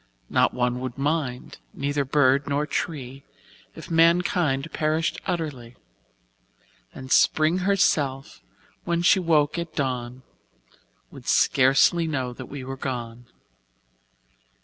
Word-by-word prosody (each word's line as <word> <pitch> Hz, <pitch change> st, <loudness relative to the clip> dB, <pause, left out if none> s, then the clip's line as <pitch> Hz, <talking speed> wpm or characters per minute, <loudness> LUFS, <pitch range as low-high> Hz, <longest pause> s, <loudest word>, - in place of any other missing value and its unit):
Not -, -, +3 dB
one 125 Hz, 0 st, 0 dB
would 130 Hz, -1 st, -6 dB
mind, 140 Hz, -3 st, -3 dB, 0.2 s
neither 145 Hz, +1 st, -1 dB
bird 140 Hz, 0 st, +2 dB
nor 145 Hz, +1 st, 0 dB
tree 135 Hz, -4 st, -5 dB, 0.5 s
If -, -, -10 dB
mankind 165 Hz, -3 st, +2 dB
perished 155 Hz, +1 st, -1 dB
utterly; 145 Hz, -10 st, -4 dB, 1.2 s
And 130 Hz, 0 st, -10 dB
Spring 160 Hz, +4 st, +3 dB
herself, 150 Hz, -8 st, 0 dB, 0.4 s
when 170 Hz, 0 st, -1 dB
she 190 Hz, -, +5 dB
woke 160 Hz, -3 st, +1 dB
at 170 Hz, -1 st, -6 dB
dawn, 125 Hz, -2 st, -3 dB, 0.9 s
Would -, -, -13 dB
scarcely 135 Hz, +6 st, +3 dB
know 130 Hz, -5 st, -3 dB
that 130 Hz, 0 st, -9 dB
we 140 Hz, -2 st, -7 dB
were 135 Hz, +1 st, -6 dB
gone. 120 Hz, -2 st, -6 dB
140 Hz, 110 wpm, -24 LUFS, 130-160 Hz, 1.2 s, she